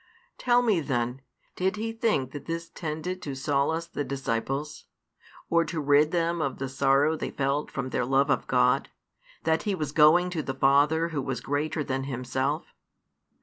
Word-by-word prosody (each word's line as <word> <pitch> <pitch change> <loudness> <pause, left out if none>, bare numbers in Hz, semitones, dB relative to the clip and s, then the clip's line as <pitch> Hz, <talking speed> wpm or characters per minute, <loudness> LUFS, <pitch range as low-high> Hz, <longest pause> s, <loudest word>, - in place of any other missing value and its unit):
Tell 245 0 +3
me 215 -7 +3
then, 125 -3 -2 0.3
did 190 +2 0
He 225 +2 -3
think 220 - 0
that 145 -1 -8
this 165 0 -4
tended 165 +3 -4
to 140 -5 -5
solace 145 +4 0
the 165 -3 -4
disciples, 135 +2 -3 0.6
or 170 0 +3
to 165 - -4
rid 145 +1 +4
them 170 0 0
of 140 -3 -2
the 135 0 -4
sorrow 140 +3 +3
they 155 - -4
felt 140 +2 -1
from 135 -1 -4
their - - 0
love 135 +3 +2
of 135 - 0
God, - - +2 0.5
that 160 0 +2
He 205 -3 -1
was 150 -5 -3
going 165 +4 +5
to 165 -3 -2
the 135 -2 -4
Father 145 +5 +3
Who 150 -4 -2
was 130 -2 -3
greater 145 +4 -2
than 135 -1 -2
Himself? 130 +3 -2
145 Hz, 175 wpm, -27 LUFS, 135-165 Hz, 0.6 s, going